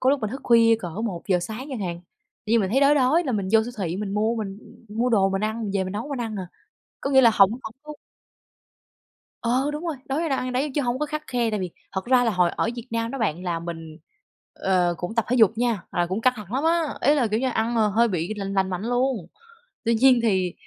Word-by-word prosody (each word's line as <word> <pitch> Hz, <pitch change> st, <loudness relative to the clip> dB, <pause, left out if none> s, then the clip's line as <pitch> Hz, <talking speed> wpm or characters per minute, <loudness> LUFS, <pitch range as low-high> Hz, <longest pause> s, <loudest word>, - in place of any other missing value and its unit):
có 260 Hz, -, +3 dB
lúc 280 Hz, -2 st, +1 dB
mình 215 Hz, -, -2 dB
thức 265 Hz, +3 st, -6 dB
khuya 230 Hz, -1 st, +5 dB
cỡ 180 Hz, -, -5 dB, 0.2 s
1:00 185 Hz, -3 st, -1 dB
sáng 220 Hz, +8 st, -6 dB
chẳng 255 Hz, -, -4 dB
hạn, 175 Hz, -3 st, -4 dB, 0.5 s
tự -, -, -4 dB
dưng 230 Hz, -, +5 dB
mình 190 Hz, -1 st, -1 dB
thấy 265 Hz, -, +2 dB
đói 280 Hz, +1 st, +5 dB
đói, 290 Hz, +5 st, +3 dB
là 260 Hz, -, -1 dB
mình 200 Hz, -4 st, -1 dB
vô 225 Hz, -1 st, +6 dB
siêu 245 Hz, +2 st, -6 dB
thị 180 Hz, -2 st, -2 dB
mình 200 Hz, -1 st, -4 dB
mua 220 Hz, +3 st, +1 dB
mình 200 Hz, -2 st, -5 dB, 0.3 s
mua 230 Hz, +4 st, 0 dB
đồ 200 Hz, -5 st, +3 dB
mình 195 Hz, +2 st, -1 dB
ăn, 220 Hz, +1 st, -2 dB
mình 205 Hz, -, -3 dB
về 190 Hz, -1 st, +1 dB
mình 185 Hz, -, -5 dB
nấu 220 Hz, +7 st, -4 dB
mình 275 Hz, -4 st, -4 dB
ăn 220 Hz, -3 st, -4 dB
à, 185 Hz, -2 st, -5 dB, 0.6 s
có 275 Hz, -, -2 dB
nghĩa 265 Hz, -1 st, +6 dB
là 235 Hz, -, +6 dB
hổng 195 Hz, 0 st, +6 dB
hổng 230 Hz, -1 st, -7 dB
có 300 Hz, -, -8 dB, 1.5 s
Ờ, 255 Hz, +5 st, +1 dB
đúng 305 Hz, +4 st, -5 dB
rồi, 315 Hz, -4 st, -2 dB
đói 315 Hz, +5 st, -1 dB
đâu 270 Hz, -3 st, 0 dB
ăn 255 Hz, 0 st, -3 dB
đấy 275 Hz, +4 st, 0 dB
chớ 290 Hz, -, +1 dB
hông 245 Hz, 0 st, -1 dB
có 300 Hz, -, -1 dB
khắt 305 Hz, +1 st, -4 dB
khe, 245 Hz, -3 st, 0 dB
tại 210 Hz, -2 st, -2 dB
vì 180 Hz, -2 st, -3 dB, 0.2 s
thật 190 Hz, -1 st, -3 dB
ra 250 Hz, 0 st, +4 dB
là 230 Hz, -, +2 dB
hồi 180 Hz, -4 st, +2 dB
ở -, -, -1 dB
Việt 240 Hz, +1 st, -7 dB
Nam 230 Hz, 0 st, -1 dB
đó 275 Hz, -, -5 dB
bạn 180 Hz, -7 st, -1 dB
là 170 Hz, -2 st, -1 dB
mình, 165 Hz, -2 st, -7 dB, 0.6 s
ờ, 180 Hz, -2 st, +1 dB
cũng 180 Hz, +5 st, -5 dB
tập 230 Hz, -2 st, +1 dB
thể 250 Hz, -, +1 dB
dục 220 Hz, -4 st, +6 dB
nha, 235 Hz, -6 st, 0 dB
là 175 Hz, 0 st, +1 dB
cũng 190 Hz, +5 st, -2 dB
căng 255 Hz, +2 st, +4 dB
thẳng 210 Hz, -1 st, -9 dB
lắm 275 Hz, +4 st, 0 dB
á, 335 Hz, +1 st, +3 dB, 0.2 s
ý 290 Hz, -, +4 dB
là, 270 Hz, -5 st, +2 dB
kiểu 215 Hz, +1 st, -1 dB
như, 260 Hz, -, +1 dB
ăn, 230 Hz, 0 st, -1 dB
ờ, 220 Hz, -2 st, +3 dB
hơi 230 Hz, +3 st, +3 dB
bị 180 Hz, +2 st, -2 dB
lành 195 Hz, -1 st, -4 dB
lành 190 Hz, -1 st, +1 dB
mạnh 180 Hz, +1 st, -3 dB
luôn. 245 Hz, -4 st, 0 dB, 0.6 s
Tuy 230 Hz, -, +3 dB
nhiên 255 Hz, +1 st, +5 dB
thì 185 Hz, -5 st, +1 dB
225 Hz, 270 wpm, -24 LUFS, 195-255 Hz, 1.5 s, vô